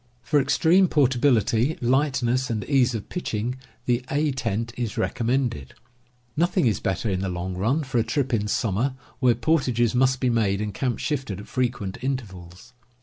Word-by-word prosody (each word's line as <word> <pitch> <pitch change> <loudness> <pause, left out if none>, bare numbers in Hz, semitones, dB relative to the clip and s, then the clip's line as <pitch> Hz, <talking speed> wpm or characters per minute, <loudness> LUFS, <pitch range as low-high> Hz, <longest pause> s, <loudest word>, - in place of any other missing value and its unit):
For 150 -2 +2
extreme 175 +7 +4
portability, 130 - +2
lightness, 130 -1 +1
and 110 -3 -2
ease 130 -4 +2
of 105 - -5
pitch 180 -10 -4
ing, 120 +5 -2 0.3
the 120 0 +1
A 150 +1 +1
tent 115 -3 -2
is 120 -4 -4
recommended. 120 - -1 0.6
Nothing 175 +1 +2
is 110 -4 +2
better,. 95 +4 -2
^ - - 0
in 90 - -1
the 95 0 -2
long 90 +1 -4
run, 120 - 0
for 130 -3 -1
a - - +3
trip 125 +4 -1
in 105 -2 +1
summer, 115 +4 0 0.2
where 125 -3 +4
portages 120 -3 +1
must 130 +1 +2
be 125 -2 +1
made 105 -4 +1
and 105 -1 -3
camp 125 -3 -1
shifted 135 - -3
at 105 - -10
frequent 120 -7 -2
intervals. 110 -5 -6
120 Hz, 175 wpm, -24 LUFS, 105-135 Hz, 0.6 s, extreme